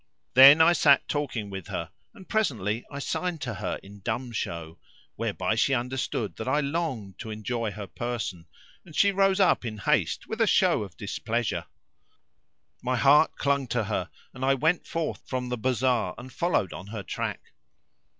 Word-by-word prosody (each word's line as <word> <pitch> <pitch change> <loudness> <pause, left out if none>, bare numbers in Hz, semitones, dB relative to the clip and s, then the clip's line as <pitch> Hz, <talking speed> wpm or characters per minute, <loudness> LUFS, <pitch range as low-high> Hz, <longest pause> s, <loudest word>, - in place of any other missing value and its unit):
Then 140 +5 +10
I 165 +2 +7
sat 145 -4 +4
talking 125 -9 -3
with 95 -3 -7
her 85 -1 -4 0.2
and 190 -4 -14
presently 115 - 0
I 140 - -7
signed 175 +4 -2
to 125 -4 -3
her - - -3
in 100 +1 -13
dumb 120 +4 -3
show, 85 -7 -5 0.4
whereby - - -1
she 135 - +2
understood 125 -3 -3
that 110 - -5
I 140 +3 +2
longed 140 - -3
to 115 - -6
enjoy 110 +1 -3
her 105 0 -6
person,[FN#525] 95 -7 -4 0.4
and 155 - -13
she 200 - +4
rose 195 0 +2
up 190 - +4
in 110 -3 -5
haste 150 +8 0
with 220 +1 -4
a 225 - +4
show 185 - +3
of 95 -4 -8
displeasure. 115 +2 -2 1.1
My 130 +1 0
heart 145 +5 +5
clung 140 -1 0
to 115 -1 0
her 100 -4 -2 0.2
and 130 - -7
I 135 +1 +3
went 160 +6 +1
forth 165 -2 -3
from 125 -1 -3
the 125 - -2
bazar 125 -5 +1
and 130 +1 -10
followed 170 - 0
on 95 - -8
her 105 -1 -6
track. - - -5
125 Hz, 175 wpm, -27 LUFS, 105-150 Hz, 1.1 s, Then